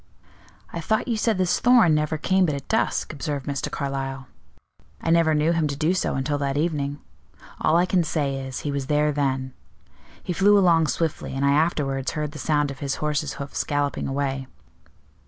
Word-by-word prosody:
"I 170 - -3
thought 220 +10 0
you 235 - 0
said 220 -1 +1
this 185 -1 +1
Thorn 240 -9 +5
never 150 +1 0
came 185 +3 +2
but 150 - -1
at 140 - -7
dusk," 220 -6 0
observed 145 -2 -4
Mr. 140 -2 -3
Carlyle. 135 -1 -4 0.7
"I 165 - -1
never 165 -2 +4
knew 150 +2 +2
him 165 -2 +1
to 140 - -3
do 155 +5 +1
so 185 - -1
until 145 +2 -1
that 140 0 -1
evening. 145 -3 -1 0.6
All 160 - +3
I 175 - +4
can 185 -1 +2
say 145 -4 -1
is, 130 -1 -5
he 145 - -3
was 140 -2 -3
there 150 0 +2
then. 135 -2 -1 0.7
He 180 - -2
flew 205 +3 +5
along 170 -5 +4
swiftly, 150 0 -2
and 135 +1 0
I 140 - +4
afterwards 140 -4 0
heard 150 -1 -3
the 150 - -9
sound 145 -1 +1
of 135 - -10
his 140 -1 -2
horse's 150 -1 -2
hoofs 140 0 -4
galloping 145 -1 -1
away. 135 -1 -2
150 Hz, 190 wpm, -24 LUFS, 140-165 Hz, 0.7 s, Thorn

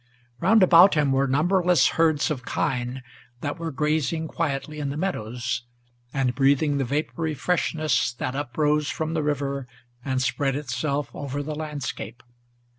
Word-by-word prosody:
Round 215 +3 +5
about 180 +1 +7
him 145 -3 +2
were 135 +1 +2
numberless 175 +5 +3
herds 160 -1 +2
of 130 -5 -3
kine, 125 +1 -2 0.4
that 145 +3 -3
were 165 -1 -3
grazing 155 +2 0
Quietly 150 -1 -3
in 145 -2 -2
the 140 - -4
meadows, 125 - -2 0.5
and 135 -3 0
breathing 140 +2 +2
the - - +1
vapory 155 +4 -2
freshness 155 -6 0
That 125 +1 -4
uprose 150 +2 0
from 160 0 -3
the 160 - 0
river, 140 -2 -2 0.4
and 130 -1 -1
spread 135 +1 0
itself 140 +1 -2
over 145 0 -4
the 155 +1 -4
landscape. 145 -6 -5
145 Hz, 145 wpm, -25 LUFS, 135-155 Hz, 0.5 s, about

